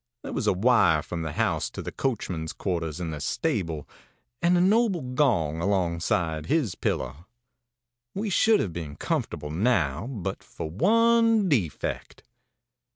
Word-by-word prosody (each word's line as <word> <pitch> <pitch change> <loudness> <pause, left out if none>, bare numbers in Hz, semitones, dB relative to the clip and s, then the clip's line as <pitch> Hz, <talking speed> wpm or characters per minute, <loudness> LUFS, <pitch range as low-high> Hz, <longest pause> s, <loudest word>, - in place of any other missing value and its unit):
There - - -6
was 110 - -1
a - - +4
wire 95 -7 +4
from 85 +2 -5
the 80 -2 -4
house - - 0
to - - -10
the - - -5
coachman's 90 -11 -3
quarters 85 -4 -3
in 85 -2 -3
the 75 -2 -6
stable, 85 - -2 0.5
and 175 +1 +4
a - - +3
noble 200 -1 +3
gong 85 - +1
alongside 85 -4 0
his 145 - +1
pillow. 65 +8 -3 0.9
ãWe 205 0 -2
should 220 +4 +4
have 90 - -3
been 80 -4 -6
comfortable 85 - -3
now 90 - +1
but 115 -9 -4
for - - -7
one 230 - +4
defect. 105 - -2
95 Hz, 145 wpm, -26 LUFS, -, 0.9 s, a